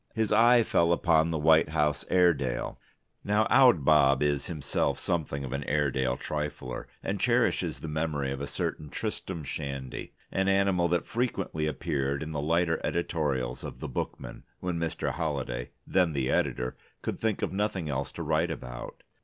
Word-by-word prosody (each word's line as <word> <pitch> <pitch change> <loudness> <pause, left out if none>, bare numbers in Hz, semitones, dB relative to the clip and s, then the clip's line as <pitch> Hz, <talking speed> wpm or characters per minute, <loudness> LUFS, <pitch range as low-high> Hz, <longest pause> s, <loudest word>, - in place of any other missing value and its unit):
His 110 -2 0
eye 120 +2 +6
fell 85 -5 +2
upon 80 -2 +3
the 80 - -1
White 80 0 +5
House 75 -1 0
Airedale. 75 -9 +2 0.4
Now 105 +2 +2
Owd 125 - +6
Bob 70 -2 +5
is 70 -1 0
himself 80 -5 -1
something 75 -5 -2
of 65 -1 -5
an 70 0 -2
Airedale 65 -3 +1
trifler, 75 -4 -4 0.2
and - - -2
cherishes - - +2
the - - -5
memory 75 -3 -1
of 70 0 -4
a 70 - -3
certain 75 - -3
Tristram 80 +2 -4
Shandy, 70 -2 -5 0.2
an 95 0 +1
animal 95 -3 +3
that 85 0 0
frequently 100 -10 -1
appeared 70 -2 -1
in 80 - -6
the 75 -2 -2
lighter 80 +2 +1
editorials 75 -6 -1
of - - -7
the - - -4
Bookman 65 - -5 0.2
when 90 -2 -2
Mr. 85 -1 -1
Holliday 70 -7 -3 0.2
(then 90 -4 +2
the 70 -3 0
editor) 60 +1 0 0.3
could - - -3
think 110 -2 -1
of - - -1
nothing 100 -4 -1
else 70 -3 -2
to - - -5
write - - +1
about. - - -7
75 Hz, 165 wpm, -28 LUFS, 70-90 Hz, 0.4 s, eye